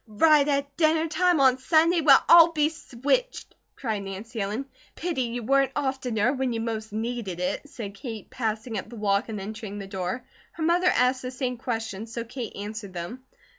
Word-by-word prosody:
"Right 290 +7 +4
at 280 -1 -1
dinner 320 0 +3
time 355 +1 +2
on 260 -1 +5
Sunday? 330 +5 +3
Well, 280 -3 +6
I'll 335 0 +8
be 300 -1 +2
switched!" 315 - -2 0.2
cried 220 -5 -2
Nancy 205 +4 -6
Ellen. 210 +7 -2 0.3
"Pity 335 -5 -2
you 240 0 -3
weren't 270 +2 +2
oftener, 260 -4 0
when 260 -3 -1
you 225 - -2
most 220 -1 -4
needed 220 -4 -3
it," 180 +11 -3
said 210 -7 -7
Kate, 220 0 -7
passing 220 -1 -2
up 200 - -9
the 240 - -10
walk 205 0 0
and 215 -2 -4
entering 210 +1 -6
the 200 - -6
door. 195 +5 -4 0.3
Her 325 - -5
mother 350 +3 +3
asked 255 -4 +3
the 255 - -4
same 255 -1 -3
questions 225 -3 -4
so 235 0 -4
Kate 235 -1 -7
answered 205 -1 -6
them. 185 +9 -6
245 Hz, 185 wpm, -26 LUFS, 215-280 Hz, 0.3 s, I'll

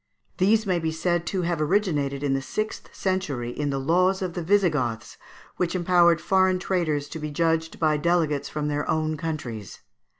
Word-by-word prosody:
These 215 +4 +3
may 185 -3 +1
be 160 -1 -1
said 170 +1 -1
to 185 -2 -1
have 170 -2 -1
originated 150 -6 0
in 140 -2 +1
the 135 - 0
sixth 215 +10 -4
century 150 -11 -2
in 145 +3 -2
the 135 - -1
laws 180 +7 +2
of 180 -2 -3
the 175 - -3
Visigoths, 160 - +1 0.4
which 180 0 -1
empowered 175 -2 +4
foreign 185 +2 +3
traders 165 -6 -1
to 160 - -6
be 150 0 -4
judged 160 +1 0
by 155 -2 +2
delegates 150 -3 +1
from 150 -1 -3
their 145 0 -2
own 155 0 0
countries. 135 - -5
165 Hz, 175 wpm, -25 LUFS, 145-180 Hz, 0.4 s, empowered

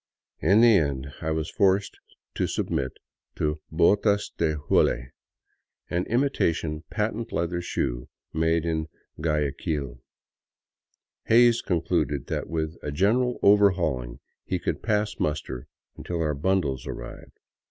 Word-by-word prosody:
In 100 +4 +4
the 115 -3 +7
end 70 -3 -1
I 80 - -2
was 80 -1 -2
forced 100 0 +2 0.3
to - - 0
submit 65 -1 -2 0.4
to 75 0 -1
botas 100 +5 +3
de 80 -2 +1
hule, 65 -3 +1 0.8
an 90 +1 0
imitation 85 - 0
patent 110 +1 -2
leather 85 +1 -1
shoe - - -3 0.2
made 80 +1 +1
in 80 -1 -1 0.3
Guayaquil. 75 -4 -2 1.2
Hays 120 0 +5
concluded 80 -6 0
that - - -3
with 80 0 -2
a 75 - -4
general 115 - +2
overhauling 85 -12 +3 0.2
he - - -2
could - - -3
pass 105 -1 0
muster 75 -5 -3 0.3
until 85 -1 -4
our 75 -2 +1
bundles 75 -4 0
arrived. - - -8
80 Hz, 120 wpm, -26 LUFS, 75-100 Hz, 1.2 s, the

